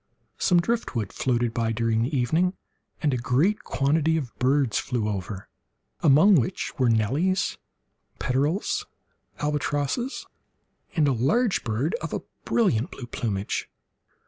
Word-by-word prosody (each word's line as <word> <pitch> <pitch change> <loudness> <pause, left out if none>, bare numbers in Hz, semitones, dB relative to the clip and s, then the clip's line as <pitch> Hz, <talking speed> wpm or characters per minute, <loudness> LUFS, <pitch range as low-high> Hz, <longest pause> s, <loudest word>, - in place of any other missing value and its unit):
Some 175 -2 +4
driftwood 170 - -1
floated 120 -2 0
by 115 -2 0
during 115 0 +1
the 135 +5 0
evening, 165 +10 +1 0.5
and 145 -3 +2
a - - +1
great 135 - +1
quantity 155 +3 +1
of 135 -7 -4
birds 130 -2 +2
flew 115 -4 -2
over, 95 -1 -4 0.5
among 160 +6 +6
which 120 - -1
were 125 -2 +4
nellies, 140 - +1 0.6
peterels, 175 - 0 0.5
albatrosses, 150 - -1 0.7
and 155 -4 +3
a - - +3
large 165 - +1
bird 115 +8 -1
of - - -4
a - - -2 0.2
brilliant 160 - +2
blue 125 - -8
plumage. 105 -4 -3
135 Hz, 125 wpm, -25 LUFS, 115-165 Hz, 0.7 s, among